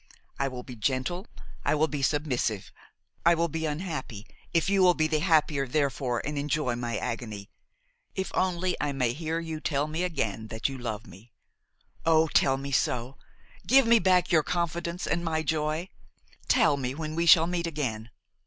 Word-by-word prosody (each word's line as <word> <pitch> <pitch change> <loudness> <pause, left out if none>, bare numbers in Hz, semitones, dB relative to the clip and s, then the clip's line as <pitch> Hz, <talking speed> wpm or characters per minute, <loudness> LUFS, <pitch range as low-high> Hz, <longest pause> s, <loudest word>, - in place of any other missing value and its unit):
I 140 - +1
will 125 -2 -6
be 125 -2 -9
gentle, 130 - -1 0.4
I - - +2
will 155 +1 +2
be 145 -3 -4
submissive, 130 -8 -1 0.5
I 170 +1 +5
will 170 0 0
be 160 +1 -2
unhappy,–if 150 - -4
you 195 0 +3
will 180 -1 +6
be 155 - +2
the 155 -1 +1
happier 150 -4 +2
therefor 130 -3 0
and 150 -1 -2
enjoy 145 -3 0
my 120 -2 -3
agony,–if 160 - -7
only 185 -1 0
I 145 -1 -1
may 125 -3 0
hear 160 +3 -2
you 160 -2 -5
tell 145 -2 0
me 155 +3 -3
again 115 - -2
that 110 0 -2
you 135 -1 -6
love 110 -2 -4
me! 110 +3 -15 0.7
Oh! 160 0 +4
tell 135 -2 +3
me 140 +1 -6
so! 125 0 -1 0.5
give 270 +1 +6
me 230 0 +6
back 185 -3 +3
your 160 -3 +5
confidence 170 +2 -2
and 170 +3 -1
my 160 -1 -1
joy! 155 +3 -1 0.6
tell 145 - +4
me 130 -1 -3
when 155 0 -4
we 170 +1 0
shall 165 0 +8
meet 170 0 -2
again. 120 -8 -3
155 Hz, 170 wpm, -28 LUFS, 130-170 Hz, 0.7 s, shall